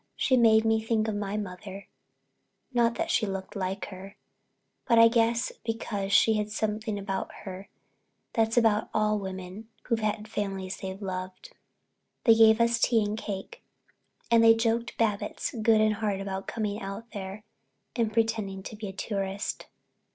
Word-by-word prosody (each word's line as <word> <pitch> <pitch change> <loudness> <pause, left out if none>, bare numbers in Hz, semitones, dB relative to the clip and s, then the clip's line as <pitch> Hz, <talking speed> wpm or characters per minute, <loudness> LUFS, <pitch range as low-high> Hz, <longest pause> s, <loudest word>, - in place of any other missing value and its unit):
She 260 - +2
made 225 -2 +5
me 225 0 +3
think 220 -1 0
of 215 - -1
my 205 0 -3
mother, 195 0 -7 0.9
not 235 -1 +3
that 335 0 -1
she 215 - +2
looked 195 +1 -5
like 190 -1 -3
her, 195 +1 -10 0.7
but 230 - +4
I 230 0 +9
guess 230 0 +2
because 210 -3 -3
she 220 +2 +5
had 210 -1 -1
something 215 0 -2
about 195 -1 -3
her 190 0 -8 0.6
that's 225 +1 +1
about 225 -2 +3
all 215 0 +2
women 190 +2 -7
who've 230 -2 0
had 215 0 -2
families 195 -3 -3
they 190 -1 -5
loved. 185 -2 -6 0.7
They 230 - +7
gave 225 0 +6
us 235 0 +3
tea 230 -2 +3
and 205 +1 -2
cake 200 -3 -6 0.7
and 230 -1 +6
they 225 0 +8
joked 230 +1 -1
Babbitts 210 -3 -1
good 220 0 +5
and 215 0 +3
hard 205 -2 -2
about 195 0 -5
coming 210 -2 -3
out 200 +4 -7
there 200 0 -7 0.5
and 230 -3 +1
pretending 220 -4 -1
to 215 - -7
be 210 0 -6
a 190 - -7
tourist. 195 0 -3
215 Hz, 160 wpm, -28 LUFS, 195-225 Hz, 0.9 s, I